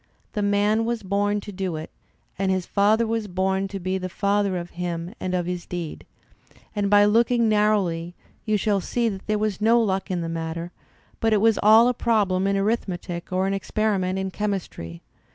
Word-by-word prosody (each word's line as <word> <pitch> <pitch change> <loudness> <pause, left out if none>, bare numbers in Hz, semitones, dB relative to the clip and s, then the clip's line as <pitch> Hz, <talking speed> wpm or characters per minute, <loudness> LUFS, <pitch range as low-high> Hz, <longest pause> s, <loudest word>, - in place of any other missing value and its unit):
The 210 - -1
man 205 +2 +2
was 230 -1 -2
bom 205 +1 0
to 205 - -8
do 190 -3 -3
it, 155 +1 -7 0.5
and 195 -1 +1
his 185 -2 0
father 215 +3 +3
was 225 -1 -2
bom 190 +1 0
to 195 0 -6
be 185 +1 -2
the 185 0 -4
father 200 +1 0
of 175 0 -6
him 175 +1 -4
and 185 0 -2
of 175 -1 0
his 180 0 -4
deed; 175 -3 -6 0.7
and 205 -1 0
by 205 0 +6
looking 230 +2 +3
narrowly 200 -6 +1 0.3
you 215 -2 +1
shall 200 -1 +1
see 235 +4 0
there 210 +1 -2
was 210 -2 -2
no 230 +2 +5
luck 195 -3 0
in 180 -2 -1
the 165 - -3
matter; 165 +1 -4 0.5
but 225 -1 +2
it - - +5
was 225 0 +3
all 220 +3 +7
a 250 - +2
problem 200 -6 +1
in 200 0 +1
arithmetic 185 -5 -2
or 185 +1 +1
an 195 - 0
experi 210 +1 0
ment 185 +1 -1
in 190 0 -2
chemistry. 185 - -4
195 Hz, 195 wpm, -24 LUFS, 180-215 Hz, 0.7 s, all